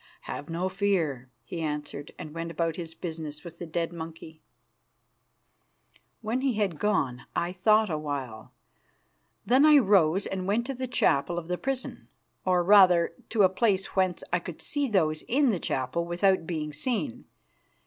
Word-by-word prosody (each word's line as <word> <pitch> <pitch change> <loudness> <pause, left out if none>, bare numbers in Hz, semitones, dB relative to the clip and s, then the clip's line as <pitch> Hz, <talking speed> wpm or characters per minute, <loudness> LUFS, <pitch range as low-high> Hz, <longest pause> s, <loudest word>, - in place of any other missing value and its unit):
"Have 145 - -7
no 170 +3 -1
fear," 180 -10 -1
he 165 +8 -6
answered; 150 -2 -4
and 150 - -8
went 165 0 -4
about 165 0 -1
his 165 -2 -7
business 160 -4 -6
with 170 -1 -11
the 175 - -6
dead 165 +1 -2
monkey. 160 -1 -9 1.8
When 230 +3 -1
he 270 -2 +1
had 200 -7 -1
gone 135 - 0
I 170 +1 0
thought 215 +2 +3
a 155 - -1
while. 135 -7 -5 0.9
Then 260 +4 +4
I 305 -1 +8
rose, 195 - +4
and 190 -1 -4
went 220 +4 +1
to 270 - -3
the 255 0 -4
chapel 170 - +1
of 170 -1 -4
the 180 - +1
prison, 270 -1 -4 0.4
or, 180 -1 +3
rather, 180 -3 +6 0.2
to 220 -3 +3
a - - +8
place 190 0 0
whence 185 -2 +1
I 175 - +3
could 170 -1 -8
see 290 -1 -1
those 155 -7 +1
in 275 +2 +3
the 195 -6 0
chapel 130 +6 -1
without 175 0 +1
being 155 -3 -3
seen. 160 - -2
175 Hz, 165 wpm, -27 LUFS, 160-205 Hz, 1.8 s, I